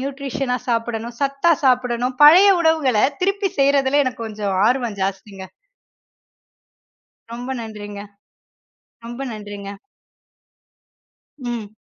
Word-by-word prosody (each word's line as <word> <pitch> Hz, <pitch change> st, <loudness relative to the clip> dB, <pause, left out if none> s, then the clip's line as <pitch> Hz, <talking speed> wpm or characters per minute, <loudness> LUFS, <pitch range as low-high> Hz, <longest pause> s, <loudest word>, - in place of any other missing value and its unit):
நியூட்ரிஷனா 270 Hz, -2 st, -3 dB
சாப்பிடணும், 230 Hz, 0 st, -2 dB
சத்தா 275 Hz, +4 st, +2 dB
சாப்பிடணும், 250 Hz, -1 st, +1 dB
பழைய 365 Hz, +7 st, +8 dB
உணவுகள 310 Hz, -8 st, +2 dB, 0.2 s
திருப்பி 395 Hz, +1 st, 0 dB
செய்யறதுல 275 Hz, 0 st, +3 dB
எனக்கு 230 Hz, -3 st, -4 dB
கொஞ்சம் 205 Hz, -3 st, -3 dB
ஆர்வம் 240 Hz, -5 st, -1 dB
ஜாஸ்திங்க. 195 Hz, 0 st, -5 dB, 1.8 s
ரொம்ப 245 Hz, +2 st, -6 dB
நன்றிங்க, 205 Hz, -2 st, -8 dB, 1.0 s
ரொம்ப 240 Hz, +3 st, -8 dB
நன்றிங்க. 205 Hz, -2 st, -8 dB, 1.7 s
ம். 235 Hz, -5 st, -6 dB
245 Hz, 85 wpm, -20 LUFS, 215-275 Hz, 1.8 s, பழைய